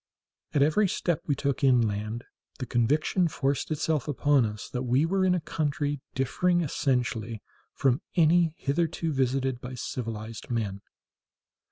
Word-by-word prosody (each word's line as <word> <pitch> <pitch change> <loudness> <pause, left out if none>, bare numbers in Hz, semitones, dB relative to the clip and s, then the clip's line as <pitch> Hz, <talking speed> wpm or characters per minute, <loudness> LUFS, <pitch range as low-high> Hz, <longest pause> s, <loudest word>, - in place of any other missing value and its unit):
At 140 - +5
every 175 +8 +3
step 170 -2 -1
we 145 - +2
took 140 0 -2
inland 115 -3 +2 0.3
the 130 - -4
conviction 150 - +2
forced 140 -3 -1
itself 155 -2 0
upon 145 -3 +3
us 105 -1 -7
that 125 - -4
we 130 +4 +2
were 190 +3 +1
in 185 -1 +3
a - - +1
country 145 -2 -2
differing 175 +7 +1
essentially 125 -7 -1 0.3
from 130 -1 +2
any 165 -1 +4
hitherto 160 +2 -1
visited 130 -1 0
by 125 +1 -6
civilized 115 -2 -5
men. 105 -5 -2
135 Hz, 140 wpm, -27 LUFS, 120-155 Hz, 0.3 s, At